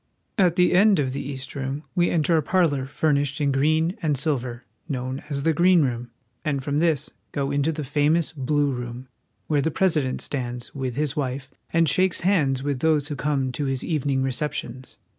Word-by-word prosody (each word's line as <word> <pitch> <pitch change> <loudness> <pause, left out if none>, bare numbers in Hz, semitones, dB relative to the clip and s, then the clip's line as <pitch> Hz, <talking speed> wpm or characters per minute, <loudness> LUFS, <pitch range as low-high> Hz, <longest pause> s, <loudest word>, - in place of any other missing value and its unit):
At 180 -3 +4
the 180 0 +4
end 200 +2 +5
of 130 -3 0
the 140 - -3
East 135 -1 -6
Room 140 +1 -4
we 175 -2 +2
enter 165 0 +2
a 160 - +3
parlor 150 -7 +1
furnished 145 -1 0
in 145 -2 +2
green 155 +6 +2
and 150 -3 +1
silver, 130 -4 -2 0.3
known 130 -1 -3
as 140 -2 -2
the 160 - +3
Green 175 +1 +5
Room, 120 -2 -2 0.3
and 140 -3 -1
from 145 +1 0
this 160 -4 +1 0.2
go 140 -1 -1
into 145 +3 +1
the 155 -1 -4
famous 150 +4 +1
Blue 145 0 0
Room, 125 0 -6 0.4
where 150 -2 +1
the 160 - +1
President 155 -6 +1
stands, 120 -3 -4
with 130 -3 -3
his 145 0 -1
wife, 135 -1 -3 0.2
and 165 0 +3
shakes 185 +5 +2
hands 150 -8 +2
with 140 -2 -1
those 150 -1 +2
who 145 - -3
come 135 -2 0
to 145 +3 -3
his 135 -2 -1
evening 140 -4 0
receptions. 130 -2 -4
145 Hz, 190 wpm, -24 LUFS, 130-160 Hz, 0.4 s, end